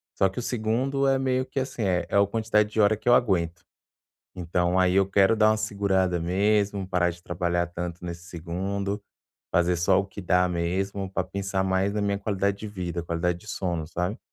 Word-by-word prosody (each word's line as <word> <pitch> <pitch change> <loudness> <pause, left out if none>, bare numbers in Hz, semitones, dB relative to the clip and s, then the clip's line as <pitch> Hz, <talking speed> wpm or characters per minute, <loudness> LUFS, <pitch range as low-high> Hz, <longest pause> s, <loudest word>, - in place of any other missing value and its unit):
Só 95 - +3
que 95 - -6
o - - -2
2º 125 +4 0
é 135 0 +3
meio 130 -1 0
que, 130 +1 -3
assim, 130 -3 -3
é 90 -3 +1
é - - +1
o 100 - +4
quantidade 105 0 +1
de 110 - -2
hora 105 0 +5
que 115 - -1
eu - - +7
aguento. 90 -7 +1 0.7
Então, 90 +1 0
aí 90 -1 +3
eu 100 -1 +4
quero 100 +2 +4
dar 110 -1 +4
uma 110 - +2
segurada 100 -4 0
mesmo, 100 +2 +1
parar 90 -2 +1
de 85 0 -12
trabalhar 85 0 -1
tanto 85 0 -6
nesse 85 0 -6
2º, 95 +4 -4 0.5
fazer 90 +1 +3
só 90 +3 +3
o 100 - +1
que 100 +1 -9
dá 90 0 +3
mesmo, 95 +3 -2
pra 95 -1 -1
pensar 95 0 -2
mais 95 +1 +1
na 105 - 0
minha 100 0 0
qualidade 100 -1 -1
de 110 - -6
vida, 90 -4 -4
qualidade 85 +1 -1
de 110 - -18
sono, 90 -4 -2
sabe? 90 +6 -3
95 Hz, 205 wpm, -26 LUFS, 90-105 Hz, 0.7 s, eu